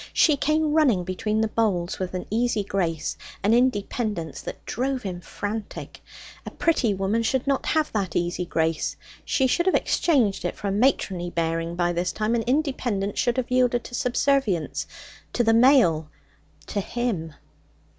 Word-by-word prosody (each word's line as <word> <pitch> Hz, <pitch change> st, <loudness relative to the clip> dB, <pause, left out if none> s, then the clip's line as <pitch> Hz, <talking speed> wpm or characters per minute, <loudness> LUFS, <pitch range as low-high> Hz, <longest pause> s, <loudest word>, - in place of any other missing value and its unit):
She 305 Hz, -, +5 dB
came 305 Hz, +2 st, +1 dB
running 265 Hz, -, +3 dB
between 210 Hz, +4 st, -1 dB
the 220 Hz, -, +2 dB
boles 200 Hz, -6 st, 0 dB
with 185 Hz, -1 st, -3 dB
an 180 Hz, -, -4 dB
easy 230 Hz, -1 st, +1 dB
grace, 170 Hz, -6 st, -2 dB, 0.3 s
an 210 Hz, +3 st, +3 dB
independence 215 Hz, -, 0 dB
that -, -, -8 dB
drove 260 Hz, +2 st, -2 dB
him 180 Hz, -3 st, -5 dB
frantic. 205 Hz, +4 st, -6 dB, 0.4 s
A -, -, -6 dB
pretty 280 Hz, -9 st, +1 dB
woman 195 Hz, +3 st, 0 dB
should 260 Hz, +3 st, 0 dB
not 275 Hz, -1 st, 0 dB
have 310 Hz, -1 st, +1 dB
that 195 Hz, -5 st, -2 dB
easy 175 Hz, +1 st, 0 dB
grace; 165 Hz, -2 st, -1 dB, 0.3 s
she 265 Hz, -, +1 dB
should 345 Hz, +8 st, +1 dB
have 375 Hz, -, +4 dB
exchanged 235 Hz, -, +2 dB
it -, -, -2 dB
for 205 Hz, -, -5 dB
a -, -, 0 dB
matronly 195 Hz, -5 st, +1 dB
bearing 165 Hz, 0 st, -2 dB
by 175 Hz, 0 st, +1 dB
this 175 Hz, +1 st, -1 dB
time, 215 Hz, +1 st, -1 dB
and 235 Hz, -1 st, +1 dB
independence 245 Hz, -7 st, -1 dB
should 240 Hz, +1 st, +1 dB
have 250 Hz, -1 st, -2 dB
yielded 250 Hz, -1 st, +2 dB
to -, -, -11 dB
subservience 250 Hz, -, 0 dB, 0.5 s
to 240 Hz, -, +2 dB
the 225 Hz, 0 st, +4 dB
male, 225 Hz, -, +5 dB, 0.6 s
to 205 Hz, -, -3 dB
him. 190 Hz, -9 st, -3 dB
220 Hz, 165 wpm, -25 LUFS, 180-255 Hz, 0.6 s, She